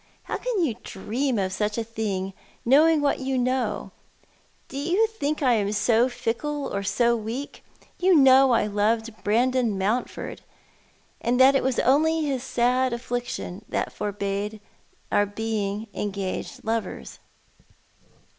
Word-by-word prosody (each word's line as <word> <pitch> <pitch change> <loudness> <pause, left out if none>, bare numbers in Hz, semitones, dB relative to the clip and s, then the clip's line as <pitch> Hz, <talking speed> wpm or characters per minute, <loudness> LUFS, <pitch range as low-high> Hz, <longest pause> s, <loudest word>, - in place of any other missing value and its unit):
" - - -36
How - - -3
can 445 -9 0
you 250 - -1
dream 240 +6 -2
of 190 -1 -1
such 210 +2 -1
a 230 - 0
thing, 205 -4 -3 0.3
knowing 305 +5 +5
what 285 -1 +1
you 265 0 -1
know? 255 +1 -1 0.8
Do - - -11
you 350 +9 +2
think 305 -10 -3
I 255 -2 +4
am 205 -3 +1
so 230 +3 +3
fickle 280 +5 -3
or 200 - -1
so 235 +4 +2
weak? 230 +6 -5 0.4
You 365 0 +4
know 270 -1 +7
I 235 -3 +3
loved 220 +2 0
Brandon 235 0 +2
Mountford, 210 +6 -2 0.8
and 245 +1 +1
that 265 +1 +7
it 270 - +3
was 265 -1 0
only 315 +4 +3
his 270 -4 -1
sad 250 0 +1
afiiictiou 240 -5 -4
that - - -2
forbade 205 +1 -3 0.5
our 205 0 +3
being 210 0 -3
engaged 200 -2 -4
lovers." 225 0 -3
235 Hz, 140 wpm, -25 LUFS, 210-270 Hz, 0.8 s, know